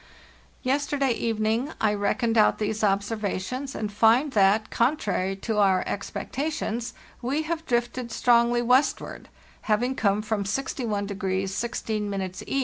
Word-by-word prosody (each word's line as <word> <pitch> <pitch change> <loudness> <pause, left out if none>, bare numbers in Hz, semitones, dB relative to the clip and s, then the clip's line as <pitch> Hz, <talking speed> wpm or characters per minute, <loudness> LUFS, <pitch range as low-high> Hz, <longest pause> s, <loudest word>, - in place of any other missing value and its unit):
"Yesterday 280 0 +1
evening 230 +4 0
I 215 -1 +2
reckoned 225 +3 0
out 215 -2 +4
these 215 0 -2
observa 200 0 0
tions 255 +8 -5
and 210 -1 -3
find 230 +7 +4
that, 210 0 +3
contrary 210 -7 0
to 210 +2 -2
our 190 -2 +4
expectations, 240 +2 -3 0.3
we 275 +6 -1
have 325 +1 -4
drifted 240 0 -1
strongly 240 +1 +3
westward, 255 +4 +1 0.4
having 240 +5 +2
come 210 -3 +1
from 215 -2 -1
61° 215 -2 -2 0.4
16° 200 -2 -3
E. 275 - 0
225 Hz, 125 wpm, -26 LUFS, 205-255 Hz, 0.4 s, out